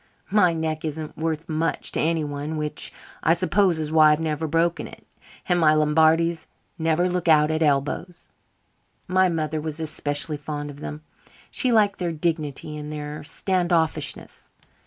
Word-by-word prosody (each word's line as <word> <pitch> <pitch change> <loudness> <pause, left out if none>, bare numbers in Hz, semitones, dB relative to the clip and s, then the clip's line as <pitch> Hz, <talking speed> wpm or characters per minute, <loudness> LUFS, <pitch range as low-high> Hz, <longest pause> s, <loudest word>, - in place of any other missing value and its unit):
My 195 -4 +5
neck 160 -1 -2
isn't 155 -1 -5
worth 160 0 -3
much 160 +1 -1
to - - -2
anyone, 155 -1 -1
which, 150 -1 -3 0.3
I 165 - +4
suppose, 185 0 +2
is 155 -1 -3
why 155 -1 +6
I've 150 - +2
never 160 0 -2
broken 165 +2 0
it; - - -14 0.4
and 180 -1 +2
my 155 -2 +5
Lombardies 160 +2 +3 0.3
never 165 +2 +2
look 180 -1 -2
out 155 -1 +5
at 155 +1 -1
elbows. 150 +4 0 0.8
My 185 0 +3
mother 155 -2 -2
was 155 0 -4
especially 150 -1 -1
fond 145 0 -5
of 145 - -13
them. 150 +1 -7 0.5
She 255 - +1
liked 210 -3 +3
their 175 -2 -1
dignity 155 -2 -2
and 150 0 -6
their 150 0 -6
stand 180 +3 -1
offishness. 160 -4 -1
160 Hz, 155 wpm, -24 LUFS, 150-170 Hz, 0.8 s, why